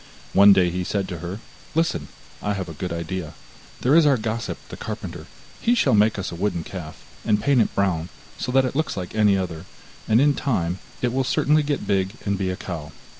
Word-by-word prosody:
One 100 +1 +8
day 90 -3 +4
he 90 +1 -2
said 100 +1 -1
to 90 - -5
her: 85 +4 -5 0.4
'Listen, 125 - +1 0.3
I 105 - 0
have 95 -3 -4
a 80 - -7
good 90 +3 -4
idea, 85 0 -4 0.5
there 130 - +3
is 160 -1 +6
our 140 -3 +4
gossip 110 +1 -3
the - - -7
carpenter, - - -6 0.3
he 240 - +3
shall - - +3
make 105 +1 +4
us 95 -3 -3
a - - -6
wooden 90 -2 -1
calf, 85 -4 -8 0.2
and 105 -1 +2
paint 140 0 +3
it - - -1
brown, 90 -4 0 0.3
so 125 - -3
that 135 0 +4
it 130 - -3
looks 155 -6 -1
like 90 -2 -5
any 105 -2 +4
other, 90 -2 -4 0.4
and 110 +1 +4
in 145 +2 +5
time 95 -11 -1 0.2
it 120 -1 +1
will 135 +1 +1
certainly 150 +4 +3
get 145 -1 -2
big 95 -1 +1
and 100 -1 +1
be 95 -1 -1
a 95 - -1
cow. 80 -5 -6
100 Hz, 220 wpm, -23 LUFS, 90-125 Hz, 0.5 s, One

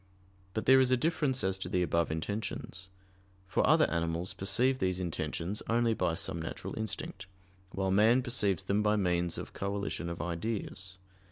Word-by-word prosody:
But 110 - -1
there 130 +1 +7
is 130 -1 +4
a 130 - +4
difference 145 -2 0
as 95 0 0
to - - -4
the 90 - +1
above 85 0 +1
intentions: 95 +2 -4 0.6
for - - +2
other - - +6
animals 85 +2 -1
perceive 130 +7 +1
these 95 -1 0
intentions 90 +2 -3
only 115 0 +3
by 90 -6 0
some 85 0 -2
natural 80 - -5
instinct, 95 -3 -5 0.4
while 95 0 -1
man 110 +6 +5
perceives 105 -7 +1
them 100 +2 +1
by 105 0 +3
means 90 -4 +1
of - - -7
coalition 100 -3 -3
of 85 - -5
ideas. 95 +1 -3
95 Hz, 165 wpm, -31 LUFS, 90-110 Hz, 0.6 s, there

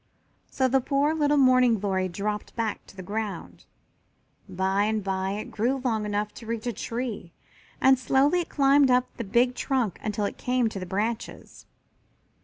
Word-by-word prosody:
So 260 - +1
the 265 +1 +2
poor 280 +4 +1
little 295 -2 +2
Morning 255 -3 +5
glory 190 -2 -1
dropped 210 +3 -4
back 225 -3 -2
to - - -15
the 190 - -8
ground. 210 +2 -5 0.8
By 190 +2 0
and 215 -1 -1
by 190 0 -2
it 210 - -6
grew 240 +5 0
long 225 -5 -1
enough 210 0 -2
to 230 - -11
reach 230 0 -4
a 240 - -1
tree 230 -5 -5 0.5
and 265 -1 +5
slowly 270 +7 +3
it 340 - -8
climbed 275 -1 +4
up 250 0 +1
the 235 - -3
big 240 +5 +2
trunk 250 - -1
until 210 -1 -2
it - - -5
came 250 -2 +1
to 200 - -6
the 185 - -6
branches. 220 +5 -4
230 Hz, 175 wpm, -26 LUFS, 205-255 Hz, 0.8 s, Morning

